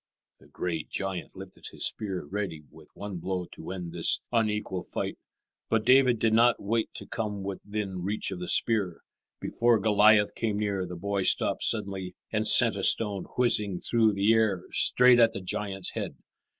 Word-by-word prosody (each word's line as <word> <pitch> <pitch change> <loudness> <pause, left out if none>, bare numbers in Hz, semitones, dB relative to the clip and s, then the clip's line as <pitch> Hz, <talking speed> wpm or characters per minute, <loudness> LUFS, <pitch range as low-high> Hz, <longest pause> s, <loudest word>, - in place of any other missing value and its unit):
The - - -20
great 85 -3 -5
giant 95 -3 -4
lifted 95 0 -12
his - - -1
spear, 95 -7 -3
ready 90 -3 -5
with - - -17
one 100 -2 -6
blow 90 +1 -3
to - - -10
end 90 -3 -6
this 85 -1 +4
unequal 105 -5 -1
fight. - - -5 0.5
But 110 -1 0
David 130 -1 +5
did 110 0 +1
not 120 +1 +4
wait 110 +2 -2
to - - -7
come 105 -3 -4
within 100 -1 -5
reach 100 +3 -2
of 95 - -6
the 90 - -6
spear. 100 -7 +1 0.4
Before 120 -1 +1
Goliath 105 0 +4
came 110 -3 -2
near, 100 -3 -2
the 90 - -7
boy 100 +3 -2
stopped - - +2
suddenly 95 -2 -1 0.2
and 110 0 0
sent - - +5
a - - -3
stone 100 -4 +1
whizzing 105 -7 +1
through 115 -2 +2
the 100 +3 +2
air 110 -5 +1
straight 125 -1 +5
at 115 -1 +4
the 100 - -4
giant's 95 0 -4
head. - - -5
100 Hz, 175 wpm, -27 LUFS, 95-110 Hz, 0.5 s, David